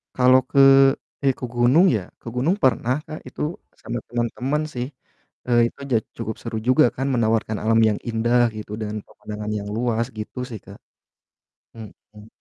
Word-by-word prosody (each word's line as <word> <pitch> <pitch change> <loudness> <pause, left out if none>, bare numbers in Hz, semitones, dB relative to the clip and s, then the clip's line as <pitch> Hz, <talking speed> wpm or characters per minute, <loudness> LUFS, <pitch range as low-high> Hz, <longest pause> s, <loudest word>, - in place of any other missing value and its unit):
Kalau 130 0 +6
ke 140 - +3 0.7
ya, 135 - +4
ke - - -3
gunung, 125 +9 +5
ya, - - -5 0.2
ke - - -13
gunung 145 +10 +2
pernah, 125 0 +2
Kak. 155 0 -7
Itu - - -9 0.4
sama 120 0 -4
teman-teman 125 +5 -1
sih, 125 0 -3 0.6
eee, 120 -1 +4
itu - - -27
ja 120 - +4 0.2
cukup 110 - -4
seru 115 -1 -4
juga 130 +5 +5
kan 135 +2 -1
menawarkan 110 -2 +1
alam 115 +1 +3
yang 105 - -2
indah 120 +2 +2 0.2
gitu 105 -1 -8
dan 105 0 -4
pemandangan 105 0 -7
yang 100 - -7
luas 115 -1 0
gitu, 105 +4 -6
sih, 110 -4 -7
Kak. - - -12 1.0
Mhm. 105 -1 -13
120 Hz, 165 wpm, -22 LUFS, 110-130 Hz, 1.0 s, Kalau